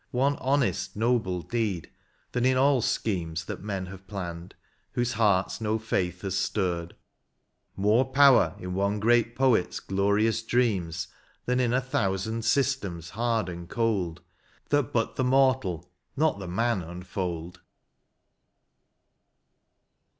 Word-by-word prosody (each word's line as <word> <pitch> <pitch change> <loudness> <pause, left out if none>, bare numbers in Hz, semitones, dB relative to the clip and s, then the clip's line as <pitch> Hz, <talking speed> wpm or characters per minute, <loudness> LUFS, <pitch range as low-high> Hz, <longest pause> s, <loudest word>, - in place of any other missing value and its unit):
One 135 +3 +1
honest, 135 0 0
noble 105 -6 0
deed, 105 -8 -2 0.4
than 125 - -1
in 130 0 +3
all 135 -1 +4
schemes 85 -7 -1
That - - -6
men 95 -2 -3
have 95 +1 -11
planned, 90 -3 -6 0.4
whose 120 0 0
hearts 105 -2 +1
no 110 0 0
faith 90 -5 -2
hath 95 -2 -2
stirred, 90 -4 -1 0.4
— - - -50 0.2
More 105 +6 +3
power 135 -1 +5
in 90 0 -6
one 100 +2 0
great 120 +2 +3
poet's 125 -8 +2
glorious 100 +3 +1
dreams 95 -8 0 0.4
Than 125 +1 +1
in 125 -2 +2
a 125 - +3
thousand 110 -2 -1
systems 110 - 0
hard 115 -1 0
and 85 -1 -7
cold. 105 -8 -1 0.5
That 145 -5 +1
but 115 -2 -1
the 130 - +1
mortal, 125 -10 +2 0.3
not 155 -7 +2
the 95 - -6
man 115 +3 0
unfold. 90 0 -5
105 Hz, 130 wpm, -27 LUFS, 90-120 Hz, 0.5 s, power